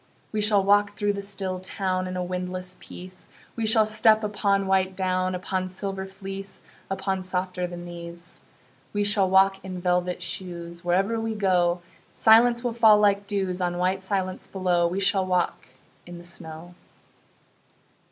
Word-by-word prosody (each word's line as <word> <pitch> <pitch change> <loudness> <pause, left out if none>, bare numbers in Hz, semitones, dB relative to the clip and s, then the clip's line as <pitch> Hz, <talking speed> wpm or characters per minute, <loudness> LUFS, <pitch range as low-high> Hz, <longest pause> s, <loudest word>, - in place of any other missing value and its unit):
We 215 - -1
shall 205 -2 +4
walk 205 +1 +3
through 205 -1 +1
the 200 - -4
still 195 -2 -4
town 185 -1 -2
In 185 0 -4
a 180 - -1
windless 180 0 -4
peace; 185 0 -10 0.3
We 225 -1 -1
shall 220 0 +5
step 215 0 +4
upon 200 -1 +1
white 190 0 +1
down, 185 -1 0
Upon 185 0 -2
silver 190 +1 -4
fleece, 195 0 -7 0.3
Upon 190 0 -2
softer 185 0 -2
than 175 0 -8
these. 170 0 -9 0.5
We 205 0 +1
shall 205 -2 +3
walk 195 0 +4
in 185 -1 -6
velvet 180 0 0
shoes: 170 -2 -6
Wherever 195 +6 +1
we 225 0 -2
go 180 -3 +2 0.3
Silence 235 +2 +5
will 240 -2 -1
fall 220 -2 +6
like 200 -1 +2
dews 190 -3 -2
On 175 -1 -1
white 185 +2 0
silence 190 -1 -2
below. 180 -3 +1
We 180 +3 -2
shall 195 0 +2
walk 180 -1 -1 0.4
in 175 0 -8
the 170 - -11
snow. 175 -1 -9
190 Hz, 160 wpm, -25 LUFS, 180-200 Hz, 0.5 s, fall